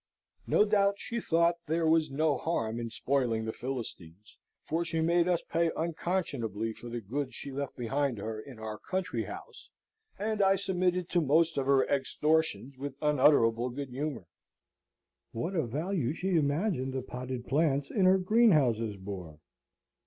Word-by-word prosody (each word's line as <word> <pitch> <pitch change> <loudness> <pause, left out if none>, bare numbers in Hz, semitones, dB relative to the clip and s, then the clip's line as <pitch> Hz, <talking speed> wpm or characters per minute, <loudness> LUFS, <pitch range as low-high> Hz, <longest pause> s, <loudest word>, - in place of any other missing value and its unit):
No 210 - +4
doubt 200 -1 +3
she 235 +2 -3
thought 170 -3 +2
there 165 +2 +1
was 160 0 +3
no 150 +2 +1
harm 115 -7 -2
in 115 -1 -4
spoiling 120 -3 0
the 110 - -3
Philistines; 105 -7 -7 0.2
for 165 +2 -1
she 165 -1 -2
made 170 +2 +3
us 175 -2 +1
pay 165 0 +1
unconscionably 145 - -2
for 120 - -10
the 120 0 -4
goods 130 +6 -4
she 140 - -6
left 140 0 -4
behind 130 +1 -1
her 110 +2 -4
in 130 0 -12
our 110 -1 -6
country 185 0 -2
house, - - -10 0.5
and 215 0 -1
I 195 0 +5
submitted 180 -2 0
to 175 - +2
most 160 +3 +3
of 135 -1 -1
her 135 -1 +4
extortions 140 -1 0
with 140 -1 -5
unutterable 130 -5 +4
good 135 +2 -5
humour. 135 - -4 1.1
What 140 +12 -3
a 160 -9 0
value 155 - -1
she 185 +3 -2
imagined 145 -2 0
the 130 -1 -3
potted 125 -1 -6
plants 140 -1 +1
in 195 -4 +2
her 185 +1 +6
greenhouses 150 - +3
bore! 95 -5 -7
140 Hz, 160 wpm, -30 LUFS, 120-170 Hz, 1.1 s, her